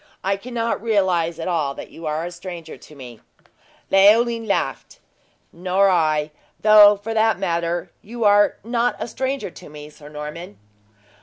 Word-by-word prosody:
I 195 +1 0
cannot 230 +1 -3
realize 185 -7 0
at 165 - -5
all 155 -6 -1
that - - -10
you 165 -1 -8
are 155 +2 -2
a 175 - -6
stranger 175 -2 -9
to 150 - -16
me!" 125 -5 -12 0.7
Leoline 225 +4 +4
laughed: 200 - -3 0.6
"Nor 185 +3 +1
I; 155 -3 +1 0.3
though, 210 -1 +7
for 215 +3 -6
that 220 -2 +2
matter, 170 -2 -2
you 235 +2 -6
are 205 0 +4
not 235 +2 0
a - - -5
stranger 265 -4 -4
to - - -13
me, 150 0 -11
Sir 150 -1 -14
Norman!" 150 - -8
185 Hz, 155 wpm, -21 LUFS, 160-215 Hz, 0.7 s, though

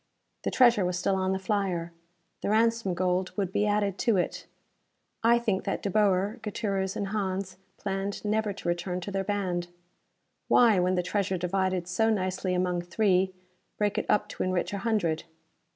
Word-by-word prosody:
The - - -1
treasure 240 -6 +5
was 180 0 -1
still 185 +2 +1
on 190 0 0
the 190 - +1
flyer. 190 -3 -1 0.5
The - - -2
ransom 225 -3 +2
gold 180 +1 0
would 195 -3 -1
be 210 - +2
added 205 -2 0
to 230 -6 +2
it. 180 - -2 0.8
I 235 +1 +6
think 215 -5 0
that - - -2
De 200 - -1
Boer, 205 +2 +2
Gutierrez 195 -3 -2
and 200 -1 -2
Hans 190 -2 -2 0.2
planned 195 +1 -3
never 215 0 +1
to 195 -3 -7
return 175 +1 -1
to 200 - -5
their 195 0 -1
band. 185 -3 -1 0.8
Why, 225 -6 +5
when 180 +1 +2
the 180 - +1
treasure 190 0 -1
divided 185 0 -1
so 220 +5 +2
nicely 185 -3 0
among 180 -1 0
three, 185 0 +2 0.5
break 205 -1 +1
it - - -4
up 210 0 +3
to - - -6
enrich 185 +1 -1
a 200 - -2
hundred? 190 -7 0
195 Hz, 175 wpm, -28 LUFS, 180-210 Hz, 0.8 s, I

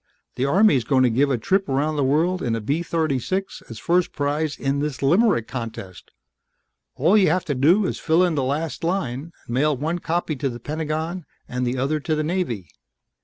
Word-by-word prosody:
The 130 - -1
Army's 150 - +4
gonna 130 0 +3
give 140 +5 +2
a 130 - +1
trip 190 - 0
around 145 +3 0
the 145 - +1
world 165 +7 +1
in 115 -3 0
a - - -2
B 140 +10 -1
36 165 +3 -2
as 115 - -8
first 175 +6 +1
prize 145 +1 -1
in 140 +1 -1
this 145 -2 -3
limerick 175 - +3
contest. 115 -7 -7 0.9
All 165 +10 +3
you 195 -6 +5
have 180 +3 0
to 145 - -1
do 165 +10 +3
is - - -3
fill 165 +3 +3
in 175 -2 +2
the 145 - 0
last 145 +6 -2
line, 165 -4 -2
and 120 - -6
mail 145 +2 +2
one 160 +6 -2
copy 170 -2 -1
to 135 0 -1
the 120 -1 -7
Pentagon 155 +4 -3 0.2
and 125 0 -2
the 125 +2 -1
other 140 +4 0
to 155 +1 -1
the 155 - -1
Navy 150 - -2
150 Hz, 200 wpm, -23 LUFS, 130-170 Hz, 0.9 s, you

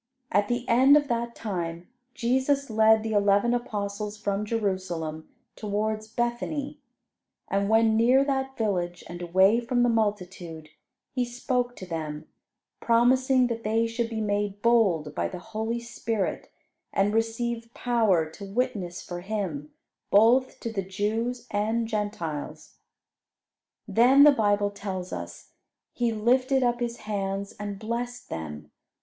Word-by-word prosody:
At 205 0 +2
the 240 +1 -2
end 265 +5 +6
of 290 -1 0
that 235 0 -2
time 175 -5 -4 0.3
Jesus 265 +2 +1
led 220 0 +5
the 225 - -3
eleven 205 +3 +3
apostles 210 -3 -3
from 205 0 -2
Jerusalem 185 -8 -2 0.3
towards 215 +1 -2
Bethany; 255 +6 -3 0.7
and 200 +1 0
when 225 0 +4
near 250 +5 +4
that 265 -1 -2
village, 180 -5 -1
and 175 +1 -8
away 190 +6 +4
from 245 +1 +1
the 245 - +3
multitude, 180 -8 -2 0.4
He 255 - 0
spoke 245 0 -2
to 185 - -8
them, 155 -3 -5 0.5
promising 255 +2 +3
that 230 -1 -3
they 225 +2 +1
should 230 0 -2
be 220 -1 -3
made 205 -1 -2
bold 195 -11 +3
by - - -1
the 185 - -7
Holy 225 +5 -3
Spirit, 230 -3 -3 0.4
and 200 +1 +1
receive 230 +1 -1
power 220 -10 +2
to 160 +6 -11
witness 195 -4 -2
for 175 -1 -6
Him 180 -8 -4 0.4
both 235 +6 +4
to 230 - -4
the 195 - -1
Jews 220 +6 -2
and 220 +3 0
Gentiles. 205 -9 -4 1.1
Then, 255 +5 +6
the 295 - +9
Bible 205 -5 +1
tells 190 -3 -5
us, - - -8 0.4
"He 240 -1 0
lifted 255 +4 +2
up 240 -1 +1
His 240 -1 -3
hands 200 -1 -3
and 205 -1 -4
blessed 240 +3 -4
them. 75 -2 -6
220 Hz, 135 wpm, -26 LUFS, 195-240 Hz, 1.1 s, the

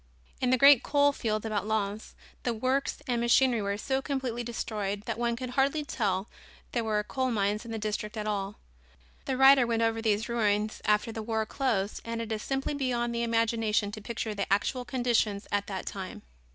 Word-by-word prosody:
In 255 - +2
the 255 - +4
great 275 0 +8
coal 285 0 +3
fields 215 -5 -2
about 215 -1 -2
Lens 215 -1 -2 0.3
the 240 -2 -1
works 260 +5 -1
and 240 -2 0
machinery 240 0 +4
were 200 0 -1
so 265 +5 -1
completely 260 -4 -2
destroyed 210 -4 -3
that 225 0 -4
one 235 -1 +1
could 250 +1 -5
hardly 280 +3 +1
tell 200 -7 -1 0.4
there 235 - 0
were 210 -1 0
coal 260 +4 -1
mines 210 0 0
in 230 - -7
the 225 - -3
district 215 0 -3
at 210 - -3
all. 205 -1 -2 0.7
The 265 -2 -1
writer 270 -2 +7
went 230 -1 +1
over 225 0 +1
these 220 0 +1
ruins 215 -2 0
after 210 +2 +2
the 220 - -5
war 220 0 -1
closed 215 -5 -1
and 230 0 -4
it 230 -1 -4
is 215 -1 -2
simply 270 +4 -2
beyond 245 -4 -1
the 235 - -1
imagination 225 -2 +1
to 215 - -7
picture 225 0 -4
the 200 -2 -3
actual 245 +5 +1
conditions 235 -6 0
at 205 0 0
that 190 -2 -4
time. 190 -2 -6
225 Hz, 195 wpm, -29 LUFS, 210-250 Hz, 0.7 s, great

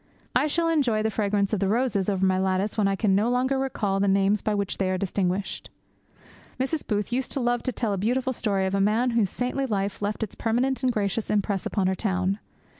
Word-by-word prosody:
I - - +3
shall 335 +3 +1
enjoy 260 -10 +2
the 220 - 0
fragrance 200 -1 0
of 210 - +1
the 195 - +1
roses 215 -3 +1
over 190 -1 +1
my 185 0 +2
lattice 190 +2 0
when 210 -3 +2
I 195 - +1
can 195 -1 +1
no 210 +4 +2
longer 260 +2 +1
recall 210 -7 -1
the 200 - +2
names 195 +1 +3
by 215 - 0
which 200 -1 -2
they 190 -1 +1
are 185 - 0
distinguished. 190 0 -2 0.9
Mrs. 270 +4 -2
Booth 210 +1 -1
used 260 +1 -1
to - - -1
love 240 -1 +1
to 255 - -1
tell 225 -3 -1
a 195 - -2
beautiful 255 +5 0
story 200 -5 0
of 190 - -2
a 195 - +2
man 225 +5 +2
whose 225 -5 +2
saintly 255 +5 -2
life 200 -3 -2
left 210 +2 -2
its 215 - -5
permanent 250 +4 0
and 255 -1 +2
gracious 210 -1 -1
impress 200 -2 0
upon 195 -3 0
her 190 0 +1
own. 190 0 0
210 Hz, 230 wpm, -25 LUFS, 195-245 Hz, 0.9 s, I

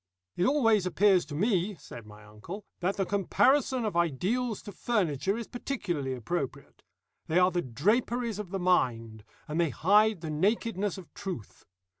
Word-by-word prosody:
"It 180 - +2
always 225 -9 +3
appears 185 +1 +3
to 145 - -6
me," 200 +2 +1
said 120 -7 -11
my 105 0 -14
uncle, 110 - -9
"that 185 +2 -1
the 195 - +1
comparison 250 +6 +2
of 210 - -2
ideals 190 - 0
to 205 - -8
furniture 195 - 0
is 235 - -4
particularly 175 - -3
appropriate. 135 +4 -5 0.5
They 160 - +1
are 180 0 +5
the 175 0 0
draperies 215 - 0
of 205 -4 -5
the 195 - -3
mind, 115 - 0 0.2
and 155 +2 0
they 165 - +2
hide 205 - +3
the 160 -2 -4
nakedness 205 +3 0
of 185 -4 -12
truth. 180 - -7
185 Hz, 160 wpm, -29 LUFS, 150-215 Hz, 0.5 s, are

